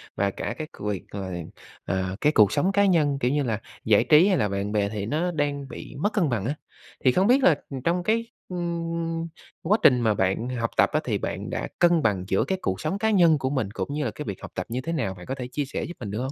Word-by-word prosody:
và 100 0 +1
cả - - -4
cái 155 - -5
việc 105 -3 -2
là, 95 -2 -4 0.5
à, 95 +1 -1
cái 150 - +4
cuộc 105 -8 +5
sống 180 +7 +2
cá 200 +1 +3
nhân, 155 -7 +3
kiểu 125 0 +1
như 145 0 +1
là, 115 -4 -1 0.3
giải 110 -2 +5
trí 155 +4 +6
hay 190 -3 +3
là 105 - +1
bạn 100 +1 -2
bè 100 -1 +1
thì 105 -2 -4
nó 160 +9 0
đang 145 -3 -2
bị - - -9
mất 205 +7 0
cân 180 -8 +2
bằng 110 -5 -1
á, 140 +5 -1 0.5
thì 130 - +5
không 185 +8 +2
biết 260 +3 +4
là 160 - +6 0.3
trong 175 +1 +1
cái, 230 +3 +1 0.2
ưm, 170 -1 -3 0.3
quá 205 +6 +3
trình 125 -3 +6
mà 110 -2 +3
bạn 95 +5 0
học 120 -2 -1
tập - - +5
á - - +3
thì - - -1
bạn - - -4
đã - - -3
cân 175 -2 +5
bằng 100 -5 +1
giữa 95 -1 +2
cái 190 - -1
cuộc 95 0 -2
sống 195 - -1
cá 220 +2 +1
nhân 170 -6 +5
của 130 -2 -1
mình 130 -8 -1
cũng 140 - -4
như 150 0 -1
là 115 - -1
cái 150 - -7
việc 100 -5 -6
học - - -8
tập 90 - -3
như 125 +2 -2
thế 165 +5 -3
nào? 95 - -1
Bạn 90 -1 -11
có 135 - -3
thể 125 -2 -5
chia 140 +3 -3
sẻ 135 - -4
giúp 175 - -5
mình 105 -5 -5
được 105 - -3
hông? 130 +2 -3
140 Hz, 270 wpm, -25 LUFS, 105-170 Hz, 0.5 s, trí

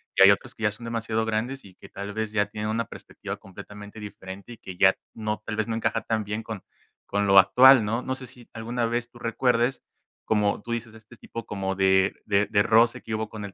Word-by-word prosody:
y - - +2
hay - - +10
otros - - -1
que 110 - -9
ya 105 - +3
son 105 +3 -13
demasiado 115 -1 -1
grandes 115 +5 -2
y 95 - -14
que - - -15
tal 100 +1 -6
vez 110 0 -3
ya 105 -1 +2
tienen 105 +1 -4
una 115 +1 -1
perspectiva - - -8
completamente 105 +2 -11
diferente 100 +1 -9
y - - -13
que 95 - -9
ya 95 0 +6 0.2
no 110 -1 -3
tal 110 - -3
vez 110 -1 -1
no 115 - -2
encaja 115 - 0
tan 110 -1 -1
bien 105 +2 -4
con 110 -4 -7 0.4
con 100 0 0
lo 95 0 +6
actual, 125 +5 +7
¿no? 115 +3 -1
No 130 +1 -3
sé 130 -1 -9
si 120 0 -15
alguna 115 +1 -2
vez 120 +1 -2
tú 120 0 -16
recuerdes, 120 +1 +1 0.4
como 105 -2 +1
tú 120 - -7
dices, 115 -1 -4
este 110 +2 -15
tipo 115 -1 -8
como 95 -1 -3
de 95 0 +3
de 100 -1 +2
de 100 -2 +3
roce 115 +1 +4
que 110 - -6
hubo 110 0 -3
con 105 -2 -7
el 100 - -9
110 Hz, 240 wpm, -26 LUFS, 105-115 Hz, 0.4 s, hay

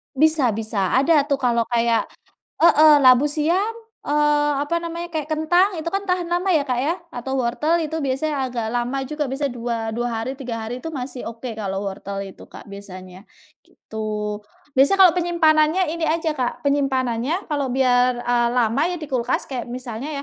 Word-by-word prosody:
Bisa 295 -4 +3
bisa 215 -4 -2
ada 285 +2 +4
tuh 280 - +2
kalau 235 -2 +2
kayak 235 -1 +1 0.5
heeh, 310 -2 +6
labu 260 +2 +5
siam, 350 +9 0 0.3
eee, 295 0 +2 0.2
apa 335 +4 -1
namanya 335 +1 -5
kayak 305 -2 -3
kentang 350 +5 +2
itu 315 - -7
kan 390 - 0
tahan 360 -1 0
lama 350 +3 0
ya 310 -5 +3
Kak, 250 -3 -1
ya 325 +5 +1 0.2
atau 265 +2 -3
wortel 280 +7 +1
itu 320 +1 -4
biasanya 270 0 -1
agak 235 -2 -3
lama 245 +3 -1
juga 300 -1 -3
biasanya 275 0 -2
dua 235 0 -3 0.2
dua 240 +1 -1
hari, 230 +4 -3
3 250 -4 -5
hari 245 +3 -6
itu 325 - -5
masih 260 -3 -6
oke 230 +1 -7
kalau 200 -2 -4
wortel 195 0 -5
itu 195 - -12
Kak, - - -12
biasanya 185 -2 -10 0.4
gitu. 210 -1 -5 0.4
Biasanya 280 +9 +4
kalau 345 - +2
penyimpanannya 335 0 +3
ini 335 - -2
aja 320 0 0
Kak, 250 -3 -3
penyimpanannya 270 - 0
kalau 285 -2 0
biar, 250 -1 +2
eee, 240 -1 +2
lama 240 +2 +2
ya 355 - -3
di 305 - -7
kulkas 250 -1 -1
kayak 255 -3 -5
misalnya 255 +4 -5
265 Hz, 175 wpm, -22 LUFS, 235-310 Hz, 0.5 s, heeh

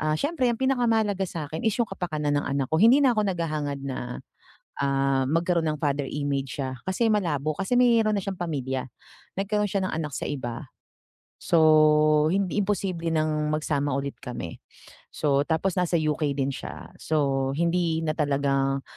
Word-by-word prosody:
ah, 155 0 0
siyempre 285 -4 0
ang 230 - -6
pinakamahalaga 225 -7 +1
sa'kin 160 +1 -5
is 220 - +3
yung 230 - +1
kapakanan 155 -6 -3
ng - - -6
anak 140 -2 -1
ko, 160 - +2
hindi 240 +6 +7
na 260 -5 +3
ako 215 - +2
naghahangad 155 -6 -2
na, 125 - -5 0.6
ah, 135 -1 +1
magkaroon 165 +3 +1
ng 155 -1 -1
father 145 -1 0
image 140 -2 -3
siya, 130 -1 -4
kasi 220 +5 +1
malabo. 155 -8 0
Kasi 195 +5 -1
meron 230 -3 +4
na 200 - -1
siyang 195 -2 -4
pamilya, 135 -7 -3 0.5
nagkaroon 210 +1 0
siya 195 0 0
ng - - -5
anak 150 -3 -4
sa - - -3
iba, 130 -1 -5 0.7
so, 155 -1 +4
hindi 195 +1 0
imposible 190 -4 -1
nang 155 -1 0
magsama 145 -2 -1
ulit 140 0 -3
kami. 105 -9 -6 0.5
So, 140 -2 +1
tapos 170 +4 0
nasa 180 -1 +1
UK 155 -1 -1
din 140 0 0
siya, - - -8
so, 135 -3 0
hindi 170 -1 +1
na 155 - 0
talagang, 140 -2 0
155 Hz, 165 wpm, -26 LUFS, 140-190 Hz, 0.7 s, hindi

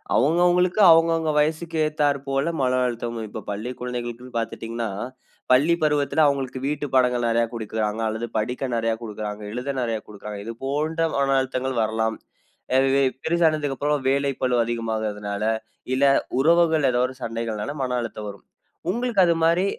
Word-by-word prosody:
அவுங்கவுங்களுக்கு 175 - +3
அவுங்கவுங்க 165 -1 +4
வயசுக்கு 160 +2 0
ஏத்தார் 145 -2 +1
போல 135 +3 0
மன 130 0 +2
அழுத்தம் 120 -1 -3
இப்ப 110 0 -7
பள்ளி 110 +5 -4
குழந்தைகளுக்கு 125 0 -5
பார்த்துட்டீங்கனா 115 0 -4 0.6
பள்ளி 145 +7 +5
பருவத்தில 150 0 +2
அவுங்களுக்கு 135 -2 0
வீட்டு 150 0 -2
பாடங்கள் 125 -2 +3
நிறைய 115 0 +2
குடுக்கிறாங்க 110 -1 -2
அல்லது 110 +2 -3
படிக்க 125 +5 -2
நிறைய 115 0 +1
குடுக்கிறாங்க. 105 -1 -5
எழுத 125 +3 -3
நிறைய 115 -2 -1
குடுக்கிறாங்க. 105 0 -8
இது 115 - -4
போன்ற 155 +4 -1 0.2
மன 135 -1 +2
அழுத்தங்கள் 130 -1 -2
வரலாம். 110 0 0 0.6
அ - - +6
இதே 135 +1 +3 0.2
பெருசானதுக்கு 155 -4 +1
அப்புறம், 145 -1 0
வேலை 140 +1 +1
பளு 125 -1 +2
அதிகமாகறதனால, 110 -3 -3 0.5
இல்ல 135 +2 +3 0.3
உறவுகள் 160 -1 +4
ஏதோ 120 - +1
ஒரு 130 - -9
சண்டைகள்னால 115 +1 -3
மன 125 -1 -1
அழுத்தம் 110 -2 -6
வரும். 100 -1 -12 0.4
உங்களுக்கு 235 0 +1
அது 170 - +4
மாரி 170 +3 +3
130 Hz, 145 wpm, -24 LUFS, 115-150 Hz, 0.6 s, அ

